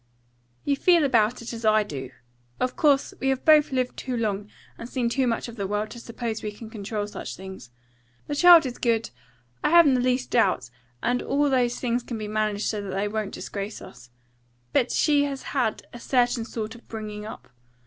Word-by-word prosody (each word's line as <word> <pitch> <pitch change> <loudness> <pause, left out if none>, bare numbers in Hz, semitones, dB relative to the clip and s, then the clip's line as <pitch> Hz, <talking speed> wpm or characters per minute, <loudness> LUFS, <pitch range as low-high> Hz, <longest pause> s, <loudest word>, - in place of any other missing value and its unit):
"You 285 - +2
feel 340 +3 +4
about 235 -3 +2
it 235 - -6
as 230 0 -7
I 215 0 +4
do. 135 -9 -6 0.5
Of 255 0 -1
course, 285 -3 +3
we 270 - -1
have 265 -1 -1
both 305 -2 +6
lived 255 -1 -1
too 255 -2 -4
long, 210 -2 -2 0.3
and 230 - -9
seen 245 -2 0
too 260 +1 +1
much 230 0 -1
of 235 0 -10
the 200 -2 -2
world, 210 +2 -2
to 235 - -8
suppose 230 -1 -5
we 210 - -4
can 220 +1 -11
control 210 -1 -4
such 205 - -7
things. 190 -10 -10 0.6
The - - -4
child 340 +1 +8
is 250 -2 -5
good, 230 -2 0 0.5
I - - +3
haven't 335 -4 +7
the 255 - +2
least 250 0 0
doubt, 130 - +2 0.3
and 245 +1 +1
all 285 +1 +1
those 245 -2 +1
things 245 -1 0
can 240 -1 -6
be 215 -1 -5
managed 215 -1 -1
so 210 -2 -1
that 200 - -6
they 200 +2 0
wouldn't 210 -1 -3
disgrace 200 +1 -5
us. 125 -1 -13 0.6
But 245 - +2
she 290 -2 +3
has 275 -2 -5
had 245 -6 -1
a 240 - -8
certain 245 -2 +1
sort 225 -1 -5
of 235 - -16
bringing 210 -2 -6
up. - - -10
235 Hz, 205 wpm, -25 LUFS, 210-260 Hz, 0.6 s, child